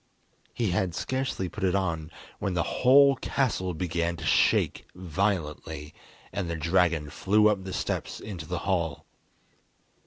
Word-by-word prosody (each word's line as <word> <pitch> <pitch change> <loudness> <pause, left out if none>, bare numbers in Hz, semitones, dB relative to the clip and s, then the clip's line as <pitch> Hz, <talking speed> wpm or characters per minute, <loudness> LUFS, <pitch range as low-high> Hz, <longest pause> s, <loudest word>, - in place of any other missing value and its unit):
He 115 -6 -1
had 90 -1 0
scarcely 130 -7 -2
put 105 +3 -7
it 95 0 +2
on, 85 -5 -1 0.3
when 95 -2 -2
the 85 - +2 0.2
whole 140 +2 +7
castle 105 - -1
began 85 0 -1
to - - -7
shake - - +2
violently, 85 -5 -2 0.4
and 95 -3 -2
the 85 - -2
dragon 80 -2 +1
flew 105 +6 +3
up 100 -3 0
the 95 - -5
steps - - -3
into 90 -7 -7
the 90 - -2
hall. 85 -6 -1
90 Hz, 145 wpm, -27 LUFS, 85-100 Hz, 0.4 s, whole